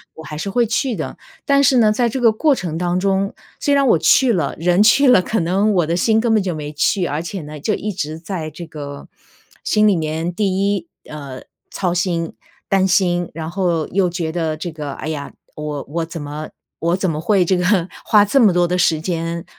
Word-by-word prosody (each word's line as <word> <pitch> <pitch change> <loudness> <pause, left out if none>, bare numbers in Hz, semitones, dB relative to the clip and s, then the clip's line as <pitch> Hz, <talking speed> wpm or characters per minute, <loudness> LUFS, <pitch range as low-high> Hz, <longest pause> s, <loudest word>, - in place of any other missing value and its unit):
我 160 - -10
还 150 0 -7
是 195 - -4
会 240 +4 +2
去 230 +2 -1
的。 - - -5 0.3
但 280 0 +3
是 265 -1 +4
呢 220 -3 +5
在 235 +2 +1
这 260 - -3
个 230 -3 +5
过 290 +7 +2
程 175 - -4
当 175 +1 0
中， 195 +1 0 0.3
虽 285 - +1
然 275 -1 +3
我 200 - +5
去 255 -3 +4
了， 165 -8 -1
人 175 +4 +3
去 270 +6 +5
了， 250 -7 +6
可 220 +5 -1
能 195 +5 +1
我 175 -3 +2
的 170 - 0
心 220 +5 +2
根 230 0 +1
本 215 -3 +3
就 180 - -2
没 150 -1 -6
去。 180 +5 +1
而 150 +1 -2
且 175 +2 -6
呢， 150 0 -9
就 210 +9 -1
一 210 - -3
直 155 -4 -4
在 165 -2 -5
这 165 +3 -9
个 145 -2 -8 0.6
心 215 0 +3
里 200 - +4
面 160 +1 -2
第 200 +2 0 0.3
1， 170 -4 -6 0.2
呃， 140 -4 -8 0.3
操 180 -3 -1
心、 175 -2 -1 0.3
担 190 -1 +2
心。 175 -3 +1
然 160 0 -5
后 175 -4 -1
又 190 -1 +1
觉 170 -2 -3
得 160 -2 -2
这 170 +2 -5
个， 150 -2 -6
哎 - - -7
呀， 150 -3 -5 0.2
我 150 -2 -5
我 165 +2 -2
怎 165 -1 -7
么 150 +1 -6 0.3
我 170 +1 +1
怎 190 -1 0
么 155 -2 -2
会 190 +1 +2
这 185 +2 +2
个 180 0 +2 0.2
花 210 -1 +5
这 270 +7 +2
么 215 -4 +6
多 175 0 +2
的 180 - 0
时 165 -3 +2
间， 165 0 -3
175 Hz, 240 characters per minute, -19 LUFS, 160-205 Hz, 0.6 s, 了